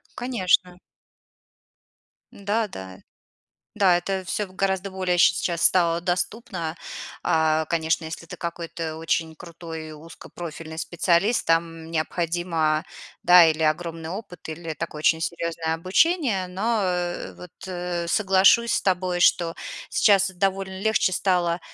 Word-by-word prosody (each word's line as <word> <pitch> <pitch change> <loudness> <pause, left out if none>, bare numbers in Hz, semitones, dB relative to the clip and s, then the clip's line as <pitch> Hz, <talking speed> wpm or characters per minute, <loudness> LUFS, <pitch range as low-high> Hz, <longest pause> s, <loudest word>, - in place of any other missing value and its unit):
Конечно. 185 -7 +1 1.6
Да, 210 +3 -1
да. 95 - -9 0.8
Да, 185 -3 +4
это 190 +1 -2
всё 205 +3 -2
в 185 - -18
гораздо 195 0 -1
более 185 -2 -1
ща - - +6
сейчас 170 -2 -2
стало 170 -2 +4
доступно. 175 -1 -3 0.5
А, 160 0 +2
конечно, 160 0 0
если 160 +1 -7
ты - - -9
какой-то 165 -1 -5
очень 160 0 -1
крутой 165 -2 -8
узкопрофильный 160 0 -9
специалист, 175 +6 +1
там 165 0 0
необходимо, 165 -1 -1 0.4
да, 175 -1 +8
или 160 0 +1
огромный 160 +1 -1
опыт, 180 -5 -8
или 160 0 -5
такое 150 - -6
очень 160 +1 +3
серьёзное 165 -1 -2
обучение. 195 - +1
Но, 215 +5 -1
э, 180 -1 -2
вот, 180 - -12 0.2
э, 175 -1 -3
соглашусь 195 +4 +4
с - - +1
тобой, 180 -1 0
что 170 -1 +3 0.4
сейчас 195 -3 +4
довольно 190 0 -2
легче 220 -4 +2
стало, 175 -2 +1
175 Hz, 125 wpm, -24 LUFS, 165-190 Hz, 1.6 s, да